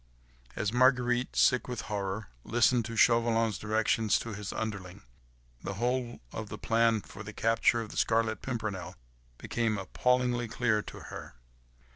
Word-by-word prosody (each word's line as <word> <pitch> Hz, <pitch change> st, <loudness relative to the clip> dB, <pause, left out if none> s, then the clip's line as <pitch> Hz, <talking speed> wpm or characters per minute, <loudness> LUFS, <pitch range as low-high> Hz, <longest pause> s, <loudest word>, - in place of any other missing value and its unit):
As 100 Hz, +1 st, -1 dB
Marguerite, 125 Hz, -1 st, +3 dB
sick 125 Hz, -, +4 dB
with 125 Hz, -3 st, -4 dB
horror, 100 Hz, -, -4 dB
listened 120 Hz, 0 st, +3 dB
to 115 Hz, -, -5 dB
Chauvelin's 115 Hz, -3 st, +3 dB
directions 110 Hz, 0 st, +2 dB
to 115 Hz, -, -5 dB
his 105 Hz, 0 st, -5 dB
underling, 100 Hz, -5 st, -5 dB, 0.6 s
the 100 Hz, -, -4 dB
whole 120 Hz, +2 st, -1 dB
of -, -, -6 dB
the -, -, -6 dB
plan 115 Hz, -1 st, +2 dB
for 100 Hz, -, -11 dB
the 110 Hz, +1 st, -8 dB
capture 115 Hz, +1 st, +2 dB
of 110 Hz, -, -7 dB
the -, -, -9 dB
Scarlet 115 Hz, -1 st, +1 dB
Pimpernel 105 Hz, -8 st, -4 dB, 0.4 s
became 115 Hz, -3 st, -1 dB
appallingly 120 Hz, +4 st, +1 dB
clear 110 Hz, -1 st, +1 dB
to -, -, -10 dB
her. -, -, -8 dB
115 Hz, 145 wpm, -30 LUFS, 105-120 Hz, 0.6 s, sick